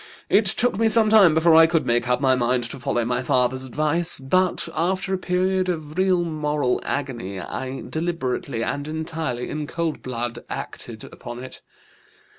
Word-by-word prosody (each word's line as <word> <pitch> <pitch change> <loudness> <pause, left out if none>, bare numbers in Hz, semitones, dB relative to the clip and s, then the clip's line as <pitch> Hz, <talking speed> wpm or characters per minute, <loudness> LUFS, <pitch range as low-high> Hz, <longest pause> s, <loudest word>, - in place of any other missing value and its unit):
It 205 +2 +4
took 215 +1 +1
me 225 0 +3
some 220 -1 +5
time 195 -8 +7
before 160 +1 +4
I 160 0 +8
could 165 -3 +1
make 120 0 +1
up 125 0 +2
my 135 -2 +3
mind 125 0 +1
to - - -8
follow 120 -1 -1
my 125 +1 0
father's 130 +1 +1
advice, 155 +6 +1
but 180 +7 0
after 190 +4 -1
a - - +1
period 185 +1 0
of 155 -3 -4
real 185 -1 +2
moral 150 -5 -1
agony 120 -9 -4
I 130 +8 -5
deliberately 140 -7 -2
and 145 +5 -3
entirely 155 -5 -3
in 150 -1 -4
cold 165 -1 -3
blood 120 -2 -4
acted - - -7
upon 120 +1 -9
it. 130 - -10
155 Hz, 170 wpm, -23 LUFS, 125-175 Hz, -, I